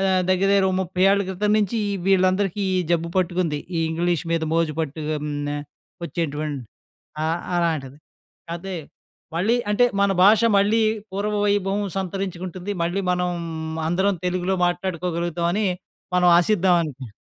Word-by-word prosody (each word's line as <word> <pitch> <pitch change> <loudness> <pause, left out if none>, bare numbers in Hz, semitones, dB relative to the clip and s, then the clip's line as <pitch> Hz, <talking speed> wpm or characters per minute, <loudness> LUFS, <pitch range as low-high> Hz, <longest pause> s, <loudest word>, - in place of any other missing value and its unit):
ఆహ్, 195 - +1 0.3
దగ్గర, 190 +1 +2
దగ్గర 195 -1 +4
ఓ - - -2
30 185 0 -2
ఏళ్ల 200 0 +3
క్రితం 205 +3 -1
నించి 210 +1 0
ఈ - - -1
వీళ్ళందరికీ 190 +1 +2
ఈ - - +2
జబ్బు 170 0 +1
పట్టుకుంది. 175 -4 0 0.2
ఈ - - +1
ఇంగ్లీష్ 170 +1 0
మీద 165 -1 0
మోజు 165 -2 +1
పట్టు 155 0 -4
హ్మ్. 150 -1 -2 0.2
ఆహ్, 145 0 -5 0.4
ఒచ్చేటువంటి 150 -4 -3 0.7
ఆహ్, 165 +2 -1 0.2
అలాంటిది. 150 -6 -1 0.5
కదే 180 +1 -5 0.6
మళ్ళీ 210 +8 +2
అంటే, 245 +4 +4
మన 200 0 +3
భాష 210 +2 +6 0.2
మళ్ళీ 210 +3 +3 0.3
పూర్వ 205 +2 -2
వైభవం 200 0 +1 0.2
సంతరించుకుంటుంది. 185 0 -4
మళ్ళీ 175 +4 0
మనం 180 0 0 0.6
అందరం 190 +3 +1
తెలుగులో 185 +1 0
మాట్లాడుకోగలుగుతాం 175 -1 -1
అని 210 +1 +1 0.5
మనం 180 0 +4
ఆశిద్దాం 185 -1 +3
అనుకా 135 -5 -7
180 Hz, 145 wpm, -23 LUFS, 165-195 Hz, 0.7 s, భాష